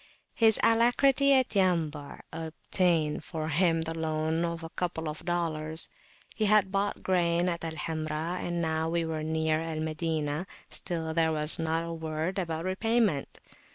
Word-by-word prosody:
His 220 -2 +5
alacrity 255 +4 +4
at 260 -2 +3
Yambu' 160 -6 0
obtained 160 -1 0
for 155 -1 -4
him 165 +1 +2
the 165 0 -4
loan 160 0 -1
of 170 -1 -3
a 165 - -7
couple 170 -3 -3
of 150 0 -5
dollars: 160 -3 -1 0.4
he 215 - 0
had 205 -2 +4
bought 200 +1 -1
grain 175 -1 +2
at 170 -2 -2
Al 165 -1 -3
Hamra, 160 +2 -3
and 175 -1 -2
now 160 0 0
we 170 0 0
were 160 -1 -3
near 160 0 0
Al 165 -1 -4
Madinah: 155 +1 -2 0.2
still 160 -3 -4
there 160 -1 +3
was 150 +1 +2
not 165 0 0
a 170 0 -5
word 160 +3 -3
about 165 -2 -3
repayment. 205 -4 0
165 Hz, 155 wpm, -29 LUFS, 160-180 Hz, 0.4 s, His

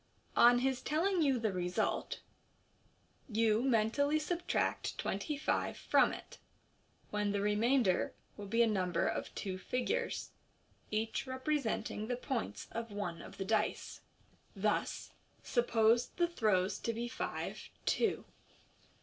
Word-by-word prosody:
On 240 +1 +7
his 260 +1 0
telling 345 +4 +1
you 275 -4 +3
the 220 -4 0
result, 180 0 -1 1.1
vol 220 0 +3
mentally 260 +4 +2
subtract 345 +3 -1
twenty 205 +10 -2
five 300 - 0
from - - +4
it, - - -9 0.7
when 210 -1 0
the 200 - +1
remainder 210 0 +2 0.2
will 205 -1 -7
be 230 +3 +4
a - - +4
number 185 -4 +1
of - - -2
two 185 -2 -4
figures, 250 - -2 0.6
each 220 +4 -1
representing 260 -5 -1
the 245 0 -1
points 250 -2 -3
of 230 -1 -4
one 200 -5 -4
of - - -11
the 195 - -3
dice. 215 +1 -1 0.5
Thus, - - -1 0.3
suppose 235 -1 +3
the 345 - 0
throws 210 - +1
to 230 - -2
be 235 +2 -3
five, 250 - -4 0.2
two. 455 - +1
230 Hz, 125 wpm, -34 LUFS, 210-260 Hz, 1.1 s, On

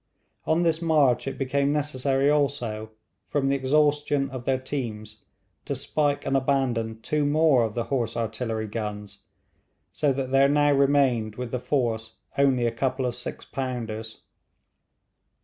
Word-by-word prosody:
On 165 +2 +2
this 165 -1 +1
march 150 -7 +3
it 135 - -4
became 140 +1 +1
necessary 140 -2 0
also, 135 -7 0 0.4
from 135 -2 +1
the 140 - +2
exhaustion 145 0 +1
of 130 -2 -7
their 135 -1 +2
teams, 110 -6 -5 0.4
to - - -2
spike 145 -2 -1
and 135 - 0
abandon 130 -5 0
two 150 +4 0
more 145 -2 +4
of 110 -2 -3
the 120 - 0
horse 120 -4 -2
artillery 115 -1 -2
guns; 105 -2 -5 0.7
so 145 -2 +1
that 130 -1 -3
there 135 +1 +5
now 145 0 +4
remained 135 -6 +2
with 125 -1 -5
the 125 - -1
force 115 -5 -1 0.2
only 135 -3 +3
a 115 - +1
couple 130 +2 -1
of 125 - -2
six 120 - -6
pounders. 115 -4 -5
130 Hz, 150 wpm, -25 LUFS, 115-145 Hz, 0.7 s, there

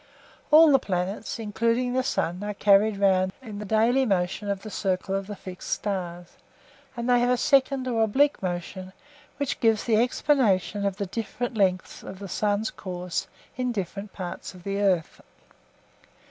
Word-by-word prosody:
All 310 0 +8
the 270 - +6
planets, 190 +2 -3
including 230 +3 0
the 260 - +2
sun, 180 -7 -2
are 205 0 -4
carried 205 +1 +4
round 190 -1 +3
in 220 -6 -8
the 210 - -5
daily 225 +6 +3
motion 195 -2 -1
of 195 -1 -2
the 215 - -7
circle 190 -1 -1
of 195 0 -2
the 205 - -6
fixed 185 -1 -9
stars, 175 -4 -4 0.6
and 235 0 -3
they 245 -1 +4
have 245 +1 +2
a 250 - +3
second 270 -1 +2
or 230 -3 0
oblique 275 +7 +2
motion 185 +1 -5 0.4
which 285 -1 -2
gives 225 -2 +3
the 225 -3 +2
explanation 215 - +2
of 195 -1 -3
the 200 - -2
different 230 +4 -4
lengths 185 -3 0
of 190 - -9
the 200 +1 -7
sun's 210 +3 0
course 180 -2 -4 0.3
in 250 -1 0
different 200 -1 -5
parts 185 0 -7
of 180 - -14
the 200 +1 -2
earth. 185 -5 0
205 Hz, 170 wpm, -26 LUFS, 185-235 Hz, 0.6 s, All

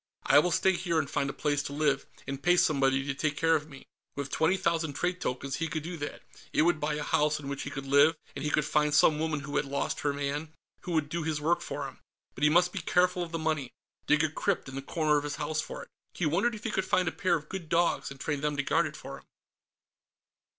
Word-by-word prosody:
I 140 +2 +7
will 180 - +2
stay 190 +2 +3
here 175 -2 -1
and 155 -3 +1
find 140 +1 -1
a - - -1
place 145 -1 0
to 140 - -6
live, 145 -2 +1 0.2
and 135 0 -5
pay 175 +2 +4
somebody 135 -4 +3
to 140 - -1
take 145 +1 -1
care 165 +1 +3
of 155 0 -2
me...." 135 -2 -12 0.3
With 140 -1 -4
twenty 160 +4 +2
thousand 165 -4 0
trade 180 +4 -2
tokens, 135 +2 -2
he 165 - -1
could 160 -1 -3
do 175 +2 -5
that. 145 -1 -6 0.3
It - - +3
would 165 -2 +2
buy 150 0 -1
a 150 - -3
house 150 +1 +1
in 140 - -8
which 140 0 -4
he - - -4
could 135 -1 -6
live, 140 +4 +5 0.2
and - - -5
he 150 - 0
could 150 -1 +1
find 150 -1 +2
some 150 0 +5
woman 155 -2 -1
who 145 +1 -3
had - - +1
lost 140 0 -2
her 145 - 0
man, 145 +2 -3 0.3
who 175 - -5
would 155 -3 +1
do 170 +3 -3
his 155 -1 -1
work 165 +4 +1
for - - -4
him. - - -12 0.3
But 140 - -6
he 150 - +6
must 175 +3 +4
be 195 - -3
careful 180 +2 +2
of 170 -2 -4
the 165 - -2
money. 155 -5 -1 0.4
Dig 155 +1 +4
a 160 - +2
crypt 190 +1 -1
in 135 - -8
the 135 - -4
corner 155 +1 +1
of 145 - -1
his 150 0 -3
house 155 0 -1
for - - -7
it. - - -15 0.3
He 175 - -1
wondered 200 +10 +1
if 210 - -10
he 225 - -2
could 190 - 0
find 185 -1 +1
a - - +1
pair 180 -1 +1
of 155 -2 -5
good 180 -3 -6
dogs 170 +1 +1
and 140 0 -10
train 145 -2 -2
them 150 0 -1
to 140 - +1
guard - - +2
it - - -9
for - - -8
him.... - - -23
150 Hz, 270 wpm, -29 LUFS, 145-170 Hz, 0.4 s, I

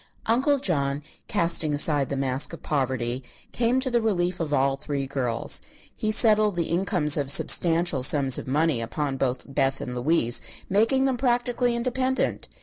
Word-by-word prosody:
Uncle 265 +6 +2
John, 145 - -2 0.2
casting 165 -3 0
aside 145 -2 +2
the 140 - -3
mask 135 +3 0
of 170 - -10
poverty, 130 -3 -2 0.3
came 240 +2 +1
to 260 -1 -1
the 240 -1 +1
relief 180 -5 -1
of 160 -3 -3
all 135 -1 +1
three 140 -1 -4
girls. 130 -4 -1 0.3
He 215 - -3
settled 215 -2 +4
the 170 -1 -2
incomes 170 -4 +1
of 140 -2 -2
substantial 165 0 +2
sums 135 0 +4
of - - -9
money 150 -2 0
upon 135 +4 -3
both 130 -1 -2
Beth 135 -1 -1
and 125 - -6
Louise, 125 -2 +1 0.3
making 230 +7 +2
them 265 -2 0
practically 245 -1 0
independent. 255 +2 -1
155 Hz, 160 wpm, -24 LUFS, 135-220 Hz, 0.3 s, settled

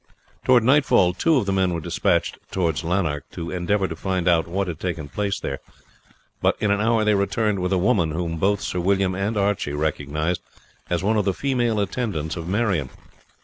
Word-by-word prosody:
Towards 125 -3 +4
nightfall 130 -9 +4
two 160 - +2
of 120 - +1
the 95 - 0
men 95 -2 +1
were - - -2
despatched 75 - 0
towards 85 -6 -1
Lanark 80 -5 -1
to 85 0 -5
endeavour 95 +2 0
to 80 - -6
find 95 0 -2
out 85 -2 +3
what 95 +3 -1
had 80 -3 -5
taken 85 -5 -3
place 100 +5 -2
there; 70 - -4 0.8
but - - +2
in 105 - +1
an 100 0 +1
hour 110 0 +2
they 105 - +4
returned 100 +1 +1
with 90 +1 -1
a 95 - +3
woman, 90 -3 +2
whom 85 +1 -3
both 100 +4 +1
Sir 90 - -2
William 95 +1 +1
and 100 +4 -2
Archie 100 -7 0
recognized 75 +2 -1 0.5
as 90 0 0
one 110 +2 +2
of 105 - +1
the 95 -2 +1
female 120 -5 0
attendants 100 -7 -2
of 85 -2 -6
Marion. 95 - 0
95 Hz, 195 wpm, -23 LUFS, 85-105 Hz, 0.8 s, Towards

